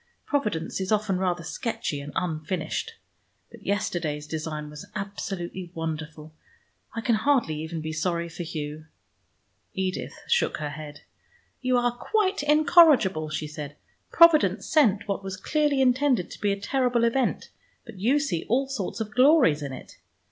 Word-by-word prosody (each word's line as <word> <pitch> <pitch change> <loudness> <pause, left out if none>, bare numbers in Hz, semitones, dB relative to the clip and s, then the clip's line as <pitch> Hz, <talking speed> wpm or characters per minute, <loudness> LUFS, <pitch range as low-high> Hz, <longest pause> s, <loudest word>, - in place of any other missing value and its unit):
Providence 210 - -1
is 190 - -3
often 210 -3 +1
rather 180 -2 -1
sketchy 160 -5 -3
and 145 +1 -8
unfinished. 180 - -2 0.6
But - - -14
yesterday's 170 -7 -2
design 155 -1 -4
was 150 0 -10
absolutely 195 -3 -5
wonderful. 155 -1 -5 0.6
I 230 - -2
can 235 +1 +1
hardly 220 - +1
even 160 0 -5
be 155 0 -4
sorry 170 +1 -1
for 170 +1 -8
Hugh." 155 -2 -6 0.9
Edith 190 -1 -3
shook 480 0 +2
her 150 -1 -4
head. 150 0 -9 0.6
"You 255 -1 +2
are 245 0 +1
quite 400 - 0
incorrigible," 295 - +5
she 155 0 -3
said. 150 -1 -7 0.4
"Providence 295 - +5
sent 220 -9 +3
what 200 -1 -2
was 190 -1 -5
clearly 295 +5 +1
intended 255 -5 +2
to - - -10
be 205 -1 +2
a 200 - -2
terrible 245 +2 +1
event, 235 +2 0 0.3
but 230 -6 -11
you 245 +9 +3
see 205 - -1
all 265 +4 +2
sorts 235 -4 -4
of 215 -1 -5
glories 255 - +5
in 140 -2 -4
it. 130 - -10
195 Hz, 150 wpm, -26 LUFS, 160-250 Hz, 0.9 s, incorrigible